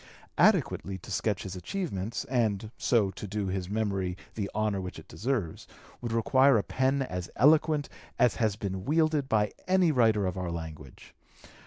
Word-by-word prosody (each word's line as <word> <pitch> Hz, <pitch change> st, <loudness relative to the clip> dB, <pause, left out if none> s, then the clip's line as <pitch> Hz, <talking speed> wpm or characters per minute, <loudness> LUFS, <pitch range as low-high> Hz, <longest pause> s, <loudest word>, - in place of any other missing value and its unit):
Adequately 95 Hz, -1 st, +3 dB
to 95 Hz, -, -11 dB
sketch 100 Hz, 0 st, -1 dB
his 95 Hz, -1 st, -6 dB
achievements, 115 Hz, -, -4 dB
and 110 Hz, -4 st, 0 dB
so 105 Hz, -6 st, +2 dB
to 105 Hz, -, -8 dB
do 100 Hz, -1 st, -2 dB
his 95 Hz, -1 st, -3 dB
memory 100 Hz, -4 st, -1 dB, 0.2 s
the 100 Hz, -2 st, -3 dB
honor 105 Hz, -2 st, 0 dB
which 90 Hz, -1 st, -6 dB
it -, -, -12 dB
deserves, 105 Hz, -, -3 dB, 0.3 s
would 120 Hz, -2 st, -4 dB
require 130 Hz, +3 st, +4 dB
a 100 Hz, -, +1 dB
pen 135 Hz, +1 st, +1 dB
as 90 Hz, -7 st, -5 dB
eloquent 150 Hz, +2 st, +4 dB, 0.3 s
as 125 Hz, -4 st, +3 dB
has 110 Hz, -4 st, +1 dB
been 95 Hz, -2 st, -4 dB
wielded 155 Hz, 0 st, +1 dB
by 105 Hz, -2 st, +2 dB, 0.2 s
any 185 Hz, -3 st, +4 dB
writer 110 Hz, -6 st, +3 dB
of 95 Hz, 0 st, -2 dB
our 90 Hz, -1 st, -3 dB
language. 80 Hz, -5 st, -8 dB
105 Hz, 165 wpm, -29 LUFS, 95-130 Hz, 0.3 s, require